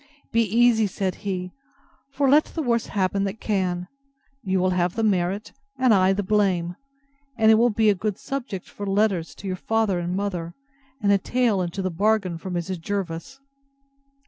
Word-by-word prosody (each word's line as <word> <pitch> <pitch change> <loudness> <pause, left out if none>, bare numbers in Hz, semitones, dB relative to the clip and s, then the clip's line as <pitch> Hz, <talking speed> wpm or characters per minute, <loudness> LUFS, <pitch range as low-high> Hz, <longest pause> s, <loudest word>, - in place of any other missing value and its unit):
Be 230 - +3
easy, 225 0 +3
said 190 -1 -2
he; 185 -3 -4 0.6
for 275 0 0
let 295 +3 +5
the 320 - -4
worst 235 -3 0
happen 195 0 0
that 200 +3 -4
can, 180 -4 -1 0.5
you 190 -4 0
will 185 0 +2
have 180 -1 0
the 225 - -1
merit, 195 0 0 0.3
and 255 -3 +4
I 190 -1 +4
the 200 +1 0
blame; 185 -4 +1 0.6
and 220 -1 +5
it - - +8
will 235 +2 +4
be 220 0 +2
a - - +3
good 200 +1 -3
subject 255 -9 -5
for 205 - -7
letters 195 -4 +1
to - - -12
your 185 -1 -2
father 220 -3 0
and 175 +1 -2
mother, 180 -4 -3 0.5
and 200 - +4
a 200 - +4
tale 235 -2 +1
into 180 +2 -3
the 185 - -1
bargain 195 -1 +1
for 190 - -7
Mrs. 175 0 -3
Jervis. 195 +6 -4
195 Hz, 180 wpm, -24 LUFS, 180-220 Hz, 0.6 s, it